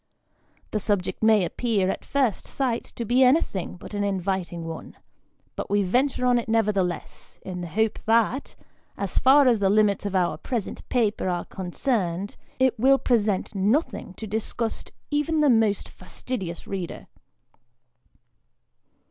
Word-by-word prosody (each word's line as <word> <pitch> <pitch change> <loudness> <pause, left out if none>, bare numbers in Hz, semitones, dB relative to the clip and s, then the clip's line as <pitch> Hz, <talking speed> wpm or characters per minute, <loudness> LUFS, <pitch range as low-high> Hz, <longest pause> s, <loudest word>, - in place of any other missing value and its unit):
The 215 - 0
subject 200 -2 -1
may 220 -4 +5
appear, 205 +1 0
at - - -6
first 265 -7 0
sight, 250 -4 -1
to 235 - -4
be 245 +4 +4
anything 250 - +2
but 185 - -11
an 205 0 -1
inviting 190 -3 -2
one, 165 0 -7 0.6
but - - -5
we 205 0 +2
venture 250 +7 +1
on 245 -1 +4
it 230 - -6
nevertheless, 200 -5 -1
in 180 -1 -5
the 175 - -4
hope 220 +6 0
that, 230 +4 +2 0.4
as 200 -2 -1
far 270 +1 +6
as 235 -4 +4
the 195 -1 +2
limits 205 -1 +3
of 195 - -4
our 175 -4 +1
present 230 -1 -4
papers 220 -6 +1
are 175 -1 -1
concerned, 190 -1 -2 0.2
it 260 -3 +2
will 270 +3 +5
present 215 -8 0
nothing 205 - 0
to 220 - -7
disgust 220 +2 -3 0.2
even 295 +2 +1
the 295 -3 +5
most 220 -3 +2
fastidious 185 -2 -6
reader. 190 -3 -5
215 Hz, 145 wpm, -25 LUFS, 190-245 Hz, 0.6 s, far